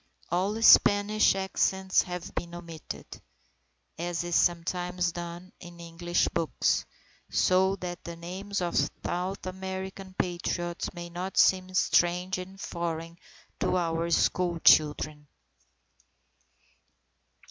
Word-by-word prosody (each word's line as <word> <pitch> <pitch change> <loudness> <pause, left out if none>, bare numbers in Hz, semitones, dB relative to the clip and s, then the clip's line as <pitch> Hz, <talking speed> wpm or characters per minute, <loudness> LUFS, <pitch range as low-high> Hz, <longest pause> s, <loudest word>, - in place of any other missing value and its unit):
All 200 +5 0
Spanish 205 -1 +6
accents 190 0 +1
have 180 -1 -6
been 170 0 -5
omitted 165 -2 -8 0.9
as 175 0 -2
is 175 -1 -2
sometimes 175 +1 +1
done 175 +2 -7
in 175 -1 -12
English 170 +1 -1
books 165 -2 0 0.4
so 190 +1 +3
that 175 -2 -6
the 170 - -7
names 185 +4 -5
of 175 -1 -2 0.3
South 185 +3 -3
American 190 0 -6
Patriots 175 0 -2
may 175 0 -7
not 180 +2 -5
seem 185 0 +4
strange 180 +1 +2
and 190 +1 -9
foreign 165 -2 -4 0.4
to - - +1
our 165 -1 -1
school 175 +1 +1
children. 150 -1 +4
175 Hz, 105 wpm, -28 LUFS, 170-190 Hz, 0.9 s, Spanish